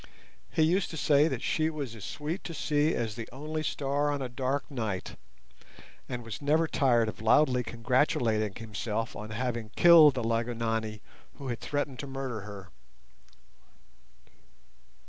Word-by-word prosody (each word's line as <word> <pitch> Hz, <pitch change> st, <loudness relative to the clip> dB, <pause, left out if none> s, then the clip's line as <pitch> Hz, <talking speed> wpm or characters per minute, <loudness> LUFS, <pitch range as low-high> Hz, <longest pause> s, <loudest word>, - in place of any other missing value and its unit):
He 160 Hz, -, +2 dB
used 180 Hz, +4 st, +2 dB
to 160 Hz, -, -6 dB
say 145 Hz, 0 st, +4 dB
that -, -, -3 dB
she 155 Hz, 0 st, +1 dB
was 145 Hz, -7 st, -5 dB
as 110 Hz, -4 st, -10 dB
sweet 155 Hz, -, -4 dB
to 170 Hz, -, -5 dB
see 150 Hz, +1 st, +1 dB
as 115 Hz, -2 st, -2 dB
the 115 Hz, -, -7 dB
only 155 Hz, +4 st, -4 dB
star 145 Hz, -1 st, 0 dB
on 145 Hz, -1 st, -1 dB
a 130 Hz, -, -3 dB
dark 130 Hz, +3 st, -1 dB
night, 110 Hz, -8 st, -3 dB, 0.9 s
and 125 Hz, -1 st, -4 dB
was 115 Hz, +4 st, -7 dB
never 155 Hz, +3 st, +2 dB
tired 120 Hz, -7 st, +3 dB
of 110 Hz, -1 st, -6 dB
loudly 125 Hz, +3 st, +4 dB
congratulating 115 Hz, -3 st, +1 dB
himself 115 Hz, 0 st, -4 dB
on 105 Hz, +1 st, -7 dB
having 120 Hz, 0 st, -3 dB
killed 165 Hz, -5 st, +8 dB
the 125 Hz, -, -2 dB
Lygonani 115 Hz, -2 st, -1 dB, 0.3 s
who 135 Hz, -2 st, -7 dB
had 120 Hz, -, -3 dB
threatened 145 Hz, -3 st, -3 dB
to 140 Hz, -, -5 dB
murder 135 Hz, -5 st, -4 dB
her. 100 Hz, -3 st, -9 dB
125 Hz, 150 wpm, -29 LUFS, 115-145 Hz, 0.9 s, killed